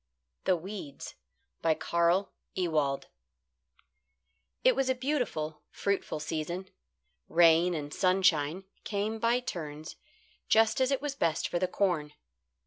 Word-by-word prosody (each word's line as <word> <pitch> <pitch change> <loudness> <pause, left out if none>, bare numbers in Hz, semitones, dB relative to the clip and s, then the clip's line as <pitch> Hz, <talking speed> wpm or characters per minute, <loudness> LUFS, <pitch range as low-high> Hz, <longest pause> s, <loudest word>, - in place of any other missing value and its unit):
THE 185 - +4
WEEDS 175 -5 -7 0.6
CARL 170 +4 +1 0.2
EWALD 155 -6 0 1.6
It - - +5
was 270 -1 +1
a 260 - +2
beautiful, 245 - -2
fruitful 200 -5 -2
season. 170 +5 -4 0.6
Rain 170 +1 +5
and 145 -1 -5
sunshine 180 -3 +2 0.2
came 215 +1 -2
by 235 +2 +2
turns 155 -8 -6 0.5
just 225 +2 +4
as 260 - +3
it 275 0 0
was 290 -2 -1
best 165 - 0
for 175 - -1
the 185 - +1
corn. 175 -6 0
180 Hz, 115 wpm, -30 LUFS, 155-215 Hz, 1.6 s, It